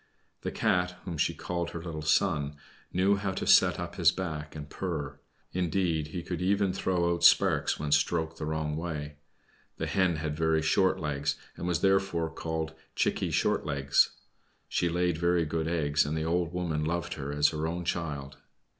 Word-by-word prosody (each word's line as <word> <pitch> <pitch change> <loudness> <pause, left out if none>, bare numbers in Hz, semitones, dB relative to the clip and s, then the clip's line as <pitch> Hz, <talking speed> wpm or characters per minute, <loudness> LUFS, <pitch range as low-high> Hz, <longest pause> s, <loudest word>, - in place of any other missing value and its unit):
The - - -2
Cat, 90 0 +1
whom 90 - -4
she 75 - 0
called 85 -1 -3
her 85 -1 -7
little 80 -3 -5
son, 75 -2 +1 0.4
knew 95 +3 +3
how 95 -1 -2
to - - -3
set - - +5
up - - -6
his - - +5
back 80 -5 -5
and 75 -1 -7
purr; 80 -3 -4 0.3
indeed, 85 -3 0
he 85 +3 -5
could 90 0 -4
even 100 0 +2
throw 85 -2 +1
out 85 0 -4
sparks 85 - +5
when 75 0 -3
stroked 80 +2 +1
the 75 - -4
wrong 80 -1 -2
way. 75 -3 -5 0.6
The - - -2
Hen 95 -3 +2
had 75 -1 -3
very 80 0 +1
short 95 +4 +3
legs, 75 -1 -1 0.2
and 85 - -5
was 85 -1 0
therefore 95 -4 +2
called 80 -1 -3 0.2
"Chickie - - +1
Short - - +1
legs." 70 -2 +2 0.5
She 85 - 0
laid 90 -1 0
very 85 -1 +2
good 80 +1 -2
eggs, 75 -4 +2
and 75 +2 -2
the 80 - -1
old 85 0 0
woman 85 -4 -1
loved 85 +1 -2
her 70 -1 -5
as 75 +1 +3
her 80 0 -2
own 85 +1 -3
child. 70 -5 -3
80 Hz, 180 wpm, -29 LUFS, 75-90 Hz, 0.6 s, set